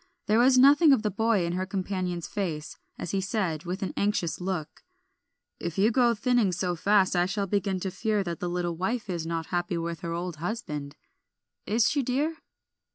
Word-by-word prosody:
There 215 +2 +3
was 255 +1 +5
nothing 285 +3 +7
of 225 - +1
the 210 - 0
boy 220 -2 +1
in 170 - -2
her 185 +1 -2
companion's 185 -3 -3
face, 165 -7 -4 0.2
as 175 - -5
he 195 - 0
said, 185 -5 -2
with 185 +3 -3
an 190 - -3
anxious 200 -5 0
look 180 -4 -4 0.8
"If 170 +1 -4
you 210 +4 +4
go 245 0 +4
on 235 - +1
thinning 230 -2 +2
so 180 0 -1
fast 195 +2 +3
I 175 0 +3
shall 200 +1 -1
begin 195 -1 -1
to 190 - -2
fear 210 +2 0
that 170 -2 -4
the 180 - -2
little 175 -1 -2
wife 205 +4 -2
is 165 -2 -3
not 165 -1 -2
happy 175 0 0
with 170 -1 -3
her 170 -2 -5
old 170 -1 -4
husband. 150 -6 -4 0.7
Is 220 +1 +3
she, 290 - +1
dear?" 285 +6 -1
190 Hz, 200 wpm, -27 LUFS, 175-215 Hz, 0.8 s, nothing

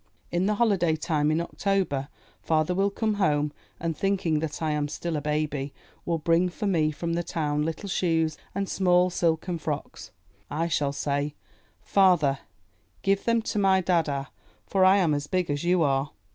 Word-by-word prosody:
In 175 +2 +1
the 210 - +1
holiday 195 -8 +2
time 155 -2 0
in 155 +1 +1
October 170 -6 -1 0.3
father 155 +2 +1
will 195 +2 +2
come 215 +2 -1
home 150 -4 +1 0.3
and, 165 -1 -2
thinking 185 -5 0
that 155 -1 -4
I 160 -1 0
am 150 -1 0
still 165 +2 -4
a 150 - -1
baby, 150 -2 -2 0.3
will 170 -1 0
bring 165 +3 +2
for 180 - -5
me 165 -6 +2
from 165 +2 -3
the 170 - 0
town 150 -3 -1
little 165 +6 -3
shoes 165 -4 +1 0.2
and 200 0 -1
small 180 -1 +3
silken 170 0 0
frocks. 150 -2 -5 0.4
I 165 +3 -1
shall 145 -2 +1
say, 145 +1 -2 0.5
"Father, 175 -9 +3 0.6
give 195 0 +1
them 230 -1 +2
to 215 - -2
my 190 -1 +4
dada, 165 -6 0 0.4
for 190 -1 +2
I 190 +1 +6
am 170 -6 +2
as 145 0 -2
big 180 -3 0
as 145 +2 -2
you 175 -1 +3
are." 135 -1 +1
165 Hz, 175 wpm, -26 LUFS, 150-185 Hz, 0.6 s, I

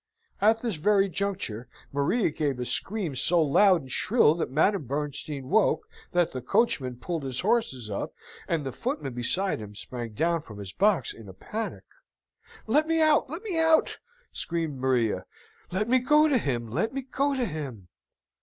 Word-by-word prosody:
At 220 +3 +4
this 225 -8 -1
very 200 +4 +3
juncture, 180 - -3 0.2
Maria 145 - +1
gave 145 -4 -1
a 125 - -2
scream 190 - -1
so 170 +7 +3
loud 175 +4 +5
and 130 -2 -11
shrill 215 -8 +4
that 165 - -2
Madame 155 - +2
Bernstein 145 0 -4
woke, 215 +6 +2 0.2
that 175 -1 +2
the 130 - -5
coachman 130 - +1
pulled 165 +5 -3
his 130 -2 -3
horses 195 - 0
up, 100 -2 -4 0.4
and 160 -4 -1
the 135 - -3
footman 240 - -3
beside 180 +11 -1
him 105 -1 -9
sprang 120 +1 -6
down 165 +7 +1
from 105 -7 -12
his 100 -1 -7
box 195 - +2
in 110 -3 -12
a - - -10
panic. 220 - -5 0.8
"Let 300 +8 +3
me 325 0 +2
out! 310 -3 +4
let 330 +8 -6
me 375 -7 -2
out!" 320 -1 +3 0.3
screamed 165 -5 -3
Maria. 125 -4 +1 0.4
"Let 200 +4 -1
me 255 +2 +4
go 300 +5 +4
to 275 -5 +3
him! 120 - -2
let 225 - -1
me 270 - -2
go 275 +2 0
to 255 -2 0
him!" 135 - -6
165 Hz, 175 wpm, -27 LUFS, -, 0.8 s, loud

